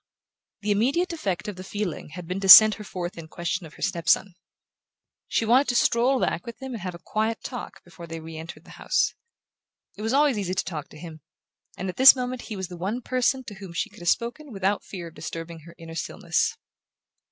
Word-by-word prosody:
The 210 0 -1
immediate 275 - +1
effect 200 - -3
of 205 -3 -5
the 185 - -7
feeling 195 -5 -4
had 180 -1 -7
been 180 +3 -3
to 195 -1 -2
send 215 +3 +12
her 210 - -8
forth 180 -3 -6
in 160 - -9
quest 170 +3 -3
of 160 -3 -12
her - - -8
step 170 0 -1
son. 195 -2 +3 0.9
She 225 - 0
wanted 255 +5 +4
to 245 - 0
stroll 245 +3 +3
back - - -1
with 235 -2 -9
him 265 -1 -6
and 225 - -6
have 180 -1 -5
a 170 - -15
quiet 220 +1 -1
talk 245 - -7
before 175 -1 -12
they 165 0 -6
re 160 0 -9
entered 160 +2 -9
the - - -15
house. - - +1 0.8
It - - -10
was 220 +1 -1
always 280 -4 +3
easy 185 -2 -2
to - - 0
talk 155 -5 -5
to - - -14
him, 160 -1 -10 0.6
and 190 - -4
at 185 - -5
this 265 +1 +10
moment 250 -1 -4
he 220 - -7
was 190 -2 -4
the 175 - -9
one 210 +8 -3
person 255 +1 0
to 225 - -9
whom 195 -3 -10
she - - -2
could - - -15
have 175 0 0
spoken 250 +5 -1
without 195 0 -1
fear 175 -4 -8
of - - -21
disturbing 165 +1 -7
her 170 - -13
inner 165 -1 -10
stillness. 165 - -1
195 Hz, 230 wpm, -25 LUFS, 170-235 Hz, 0.9 s, send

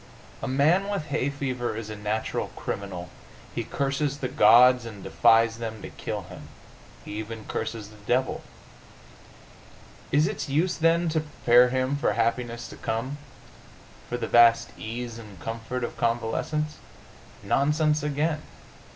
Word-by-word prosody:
A - - -3
man 160 +9 +3
with 200 -8 -3
hay 140 -1 0
fever 130 -5 -3
is 110 -1 -6
a - - -5
natural 105 +1 -2
criminal. 90 -3 -5 0.4
He - - -2
curses 140 +1 -1
the 135 - -2
gods, 125 -1 +6
and 110 -4 -9
defies 115 -1 +4
them 110 -1 -5
to - - -7
kill - - -5
him. - - -11 0.6
He - - -8
even 110 0 -7
curses 110 -3 -4
the 105 -1 -16
devil. 130 +2 +1 1.7
Is 150 +2 +4
its 200 -7 -4
use, 165 +6 +1
then, 165 +1 +3
to 160 0 +1
prepare 125 -4 +4
him 130 +2 0
for 120 -6 +1
happiness 115 +1 -1
to - - -10
come 130 +6 -3 0.9
for 120 - -2
the - - -3
vast 115 0 +5
ease 115 +1 -6
and 105 -5 -12
comfort 115 +4 -4
of - - -4
convalescence? 120 +6 -1 0.7
Nonsense 150 +2 +2
again! 150 +2 -1
125 Hz, 140 wpm, -26 LUFS, 115-145 Hz, 1.7 s, gods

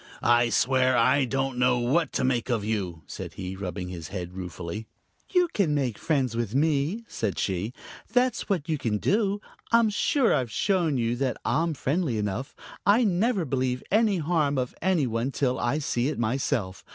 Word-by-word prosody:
"I 120 0 +4
swear, 130 +1 +3
I 130 +4 +4
don't 135 0 -2
know 125 0 +4
what 135 +6 +1
to - - 0
make 125 -1 0
of 115 -4 0
you," 95 -7 -3
said - - -7
he, 95 0 -5
rubbing 90 -1 -5
his 85 -4 -6
head 90 -1 -6
ruefully. 90 +3 -6 0.4
"You 360 -2 +3
can 165 -8 +2
make 130 -7 -1
friends 135 -7 0
with 115 -1 -2
me," 155 +9 +1
said 105 -4 -3
she. 95 +3 -1 0.4
"That's 250 0 +1
what 175 -6 0
you 155 -3 -1
can 110 -5 0
do. 205 - +1 0.3
I'm 230 -2 +4
sure 245 +4 +2
I've 125 -3 0
shown 175 - +1
you 115 0 0
that 130 -1 -1
I'm 165 +1 +1
friendly 140 -3 0
enough. 105 +6 -3 0.3
I 215 +5 +5
never 200 -1 +1
believe 130 -2 -1
any 215 -1 +3
harm 155 -3 +1
of 125 -1 -1
any 180 -5 +2
one 115 +2 -1
till 130 -2 0
I 120 +5 0
see 130 -4 0
it 150 - -2
myself. 110 -5 -1
130 Hz, 180 wpm, -26 LUFS, 115-165 Hz, 0.4 s, I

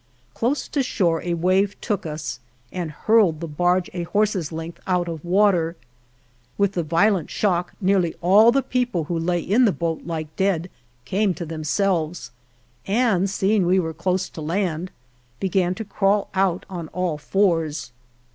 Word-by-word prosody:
Close 260 +5 -1
to 285 - 0
shore 175 -10 +1
a 175 -1 -1
wave 185 +4 +1
took 205 -7 -2
us 150 -3 -5 0.3
and 175 -3 -3
hurled 185 0 +3
the 170 - -5
barge 175 +4 +1
a 175 - -3
horse's 195 -2 0
length 165 +1 -6
out 180 -2 +1
of 165 -3 -5
water. 175 -2 +2 0.8
With 200 -1 +2
the 180 - -1
violent 170 +2 +2
shock 180 -4 0
nearly 185 -4 +1
all 205 +6 +6
the 275 +2 +1
people 245 -9 -1
who 165 +2 -2
lay 175 +1 0
in 230 +9 +3
the 215 - +4
boat 165 -3 -2
like 160 -2 -5
dead 185 -3 0 0.3
came 195 +4 +1
to 170 - -5
themselves, 165 +1 -1 0.6
and, 200 -3 +2
seeing 200 +1 +2
we 185 +2 +4
were 160 -2 -2
close 185 +3 -1
to 160 - -9
land, 170 +1 -1 0.5
began 185 -1 +1
to 220 - -6
crawl 200 0 +1
out 190 -2 +1
on 175 -4 -6
all 170 -2 -2
fours. 165 -6 0
180 Hz, 160 wpm, -23 LUFS, 165-200 Hz, 0.8 s, all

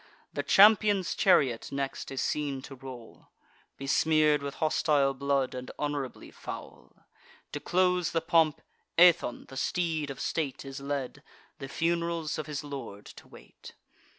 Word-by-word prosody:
The 145 - -1
champion's 200 +4 +5
chariot 130 -11 +2
next 140 -1 -4
is 135 - -3
seen 140 -3 -2
to 140 - -9
roll, 125 -3 -11 0.5
Besmear'd 150 +1 +2
with 140 0 -5
hostile 150 -3 +2
blood, 140 -1 0
and 125 0 -7
honourably 145 -3 -4
foul. - - -10 0.5
To 145 - -4
close 180 +1 +1
the 165 - +1
pomp, 165 -2 +2 0.3
Aethon, 175 -7 +4
the 135 - -9
steed 160 -1 -1
of 135 - -7
state, 145 -5 -3
Is 135 +1 -7
led, 140 -2 -4 0.4
the 135 - -6
fun'rals 170 0 -1
of 155 - -5
his 150 -2 -4
lord 135 -8 -8
to - - -13
wait. - - -15
145 Hz, 140 wpm, -29 LUFS, 135-165 Hz, 0.5 s, champion's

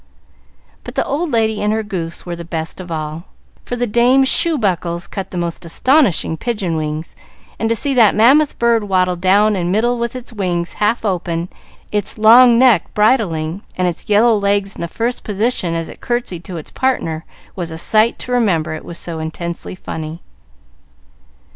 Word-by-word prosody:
But - - -9
the - - 0
old 325 +4 -2
lady 220 -4 +1
and 210 0 +1
her 220 0 0
goose 175 -6 -5
were 175 -1 -4
the 170 - -8
best 165 +1 -5
of 180 -2 -10
all, 155 +1 -4 0.4
for 245 - -3
the 245 0 -1
dame's 245 +4 +3
shoe 335 -2 +3
buckles 175 -6 -1
cut 195 -2 -6
the 180 - -7
most 170 0 -3
astonishing 195 - +2
pigeon 205 -7 -2
wings, 155 +1 -4 0.4
and 225 - 0
to 230 - +2
see 275 +4 +1
that 230 -5 +5
mammoth 270 +7 +4
bird 235 -2 +2
waddle 185 -2 +1
down 200 +4 +3
the 185 -3 -1
middle 220 +7 +1
with 235 +1 -3
its 245 -1 -8
wings 180 -4 -2
half 220 +2 +1
open, 175 -3 -2 0.4
its 210 0 -2
long 235 +2 +7
neck 240 -8 +4
bridling, 195 -6 +1 0.2
and 185 -1 +1
its 175 +3 -5
yellow 220 +3 +5
legs 200 -1 0
in - - -8
the 170 - -2
first 230 +8 -3
position 205 -4 -1
as 165 -1 -3
it - - -12
curtsied 240 -8 -3
to 180 -1 -6
its 155 - -8
partner, 165 -12 -1 0.3
was 175 -3 -4
a 160 - -6
sight 215 +6 +2
to 250 - -8
remember, 190 -11 +1
it 155 - -7
was 170 - -7
so 165 -2 -5
intensely 170 +3 -5
funny. 160 -2 -7
200 Hz, 185 wpm, -17 LUFS, 170-235 Hz, 0.4 s, long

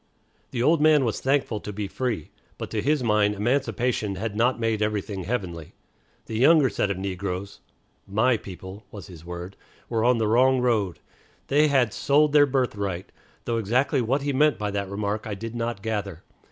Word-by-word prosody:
The 120 - -2
old 160 +2 +4
man 150 -3 +5
was 115 - -1
thankful 135 -5 0
to 105 - -7
be 105 0 -4
free; 115 -6 -3 0.3
but - - -6
to 110 - -1
his 145 +1 +1
mind 105 -2 +2
emancipation 115 -2 0
had 105 +2 -4
not 120 +3 +2
made 115 -2 0
everything 105 -3 -2
heavenly. 90 -8 -4 0.5
The 110 -1 -4
younger 140 -1 +5
set 100 - 0
of 100 - -2
negroes 95 0 -4 0.5
("my 110 +6 +2
people" 95 0 -9
was 100 - -9
his 85 -5 -12
word) 90 +2 -7 0.3
were 115 -2 0
on 125 0 +4
the 110 -1 +1
wrong 130 +4 +4
road. 110 -8 +1 0.5
They 150 +2 +4
had 130 -6 +2
"sold 145 +1 +3
their 145 -1 +6
birthright," 100 -9 -2 0.3
though 115 -1 -1
exactly 125 +6 +1
what 135 +5 0
he 145 0 -1
meant 150 +2 +3
by 105 -1 -2
that 100 -1 -3
remark 105 +2 -3
I 105 - -3
did 115 +3 -6
not 115 -3 -3
gather. 100 -6 -3
110 Hz, 180 wpm, -25 LUFS, 100-130 Hz, 0.5 s, their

